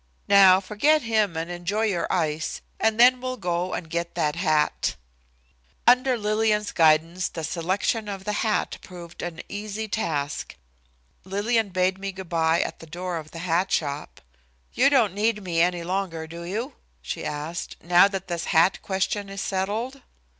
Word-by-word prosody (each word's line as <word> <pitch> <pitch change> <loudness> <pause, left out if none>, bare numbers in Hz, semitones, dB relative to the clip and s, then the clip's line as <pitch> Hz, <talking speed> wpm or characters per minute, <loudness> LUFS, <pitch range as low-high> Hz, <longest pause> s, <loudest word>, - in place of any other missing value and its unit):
Now 195 -2 +7
forget 245 +11 +2
him 215 -7 +1
and 165 +2 -3
enjoy 175 +5 -2
your 190 -6 -1
ice, 160 -3 -1 0.2
and 220 0 +1
then 250 +1 +6
we'll 255 0 -3
go 175 -1 -2
and 165 - -5
get 170 +1 -3
that 150 -1 0
hat." 155 -4 +1 0.9
Under 250 +1 +5
Lillian's 210 0 +1
guidance 165 +2 +3
the 165 - -6
selection 190 +6 -1
of 195 -1 -5
the 210 +1 -2
hat 215 -2 0
proved 175 -2 -10
an 170 -2 -5
easy 210 +1 -5
task. 155 -10 -3 0.7
Lillian 205 +3 0
bade 185 +1 0
me 195 0 -4
good 190 -2 -9
by 165 -1 +2
at - - -4
the 165 - -12
door 175 +2 -4
of 155 -1 -8
the 165 - -10
hat 180 +2 +1
shop. 145 -1 -2 0.5
"You - - +4
don't 235 -9 +3
need 210 +1 0
me 170 -3 0
any 175 0 +1
longer, 180 -3 -2
do 170 +1 -8
you?" 225 - -4 0.3
she - - -5
asked, 155 +4 -4
"now 175 +2 +6
that 195 -1 -5
this 170 -2 -3
hat 165 +4 +3
question 195 +1 -2
is 195 0 -5
settled?" 215 +8 -2
185 Hz, 165 wpm, -25 LUFS, 170-210 Hz, 0.9 s, Now